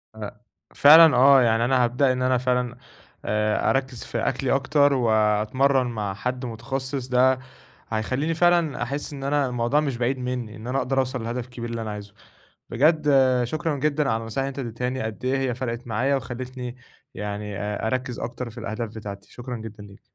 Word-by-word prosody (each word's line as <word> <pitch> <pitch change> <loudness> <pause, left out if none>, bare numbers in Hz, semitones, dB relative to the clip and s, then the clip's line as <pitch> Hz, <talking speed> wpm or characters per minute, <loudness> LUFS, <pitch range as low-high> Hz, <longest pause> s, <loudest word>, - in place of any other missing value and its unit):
أ 105 -2 -6 0.4
فعلًا 160 +2 +8
آه، 135 +1 +7
يعني 115 -1 +3
أنا 125 0 +3
هابدأ 130 +2 +2
إن 130 0 -2
أنا 130 0 +2
فعلًا 125 -1 0 0.5
آآ 105 0 +1
أركِز 130 -3 -1
في - - -5
أكلي 130 +3 -1
أكتر 140 +1 +3
وأتمرن 120 +3 +2
مع 105 -4 -3
حد 125 +5 -4
متخصص، 130 +3 -4
ده 130 +1 +3 0.5
هيخلّيني 130 +9 -1
فعلًا 170 -5 +2
أحس 140 +4 -4
إن 135 -1 -7
أنا 145 0 +1
الموضوع 120 +4 +1
مش 140 -5 -1
بعيد 125 +2 0
منّي، 125 -3 -4
إن 110 +2 -9
أنا 130 +2 -1
أقدر 135 0 0
أوصل 130 -2 -2
لهدف 120 +1 -4
كبير 120 -2 -7
اللي 115 -1 -4
أنا 110 -1 -4
عايزه. 105 -1 -8 0.6
بجد 150 +4 +3 0.3
شكرًا 155 +5 -2
جدًا 150 -1 +1
على 110 0 0
النصايح 115 +4 -3
اللي - - -2
أنت 140 - -8
اديتهاني، 125 +2 -3
قد 110 +2 -6
إيه 130 +1 +1
هي 130 -3 -1
فرقت 120 -1 -4
معايا 125 +5 +1
وخلّيتني 125 -1 -6 0.4
يعني 105 0 -5
آآ 105 +1 -3
أركِز 125 0 -2
أكتر 120 0 -5
في 120 - -15
الأهداف 115 0 -4
بتاعتي، 100 -2 -8
شكرًا 120 0 -6
جدًا 110 -1 -9
ليك. 100 -1 -15
125 Hz, 180 wpm, -24 LUFS, 115-135 Hz, 0.6 s, فعلًا